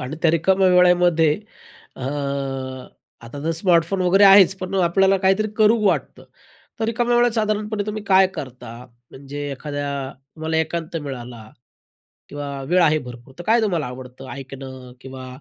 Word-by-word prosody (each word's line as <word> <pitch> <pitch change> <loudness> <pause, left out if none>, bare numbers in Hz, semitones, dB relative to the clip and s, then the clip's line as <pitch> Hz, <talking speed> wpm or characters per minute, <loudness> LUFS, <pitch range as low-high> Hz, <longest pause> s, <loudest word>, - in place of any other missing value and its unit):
आणि 130 +4 -6
त्या 165 - +4
रिकाम्या 190 +4 +2
वेळेमध्ये, 180 -3 +4 0.6
अ, - - -11 1.2
आता 130 +5 -9
तर 165 - 0
स्मार्टफोन 175 +1 +1
वगैरे 190 +3 +4
आहेच, 195 -1 +7
पण 185 +1 -5
आपल्याला 195 +3 +3
काहीतरी 195 +3 +1
करू 215 +2 +5
वाटतं. 190 - -1 0.6
तर 220 - +1
रिकाम्या 240 +1 0
वेळात 240 0 +4
साधारणपणे 215 -1 -1
तुम्ही 210 0 -4
काय 190 -2 +5
करता? 125 -4 -8 0.4
म्हणजे 145 +1 -7
एखाद्या, 140 -1 -5 0.2
तुम्हाला 160 0 -2
एकांत 160 +1 -2
मिळाला 120 -5 -8 0.8
किंवा 145 0 -6 0.2
वेळ 180 +2 +3
आहे 155 -1 +3
भरपूर, 125 -1 -11
तर 175 - -8
काय 225 +4 +3
तुम्हाला 175 -9 0
आवडतं? 125 +1 -10
ऐकणं 130 -1 -9
किंवा 130 -1 -9
165 Hz, 145 wpm, -21 LUFS, 135-195 Hz, 1.2 s, आहेच